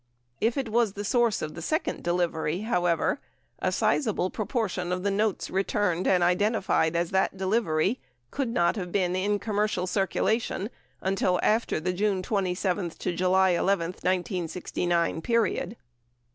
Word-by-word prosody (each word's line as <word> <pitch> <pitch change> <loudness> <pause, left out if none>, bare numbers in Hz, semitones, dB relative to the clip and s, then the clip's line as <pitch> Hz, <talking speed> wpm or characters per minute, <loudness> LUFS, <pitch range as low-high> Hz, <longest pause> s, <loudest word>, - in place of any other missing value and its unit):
If 230 +3 +1
it 265 -4 -1
was 225 -2 +2
the 205 - -5
source 235 -1 +2
of 155 - -4
the 170 - -8
second 315 - -1
delivery, 175 -1 0
however, 175 -6 +1 0.4
a - - 0
sizable 210 -8 +1
proportion 205 -5 -2
of 180 0 -2
the 200 - +1
notes 210 0 0
returned 190 -2 0
and 180 -2 +4
identified 185 -2 +2
as 170 0 0
that 190 0 +1
delivery 190 +1 +1 0.3
could 275 -2 -1
not 175 -4 +2
have 180 -3 -4
been 180 -2 +1
in 205 +2 +1
commercial 210 -3 -1
circula 195 +4 +1
tion 210 +1 -4 0.3
until 185 -1 +1
after 220 -5 +2
the 180 +3 -1
June 195 0 0
27 185 -3 -1
July 185 +2 +2
11, 175 -1 +1
1969 175 -2 -1
period. 230 +1 0
190 Hz, 145 wpm, -27 LUFS, 175-210 Hz, 0.4 s, and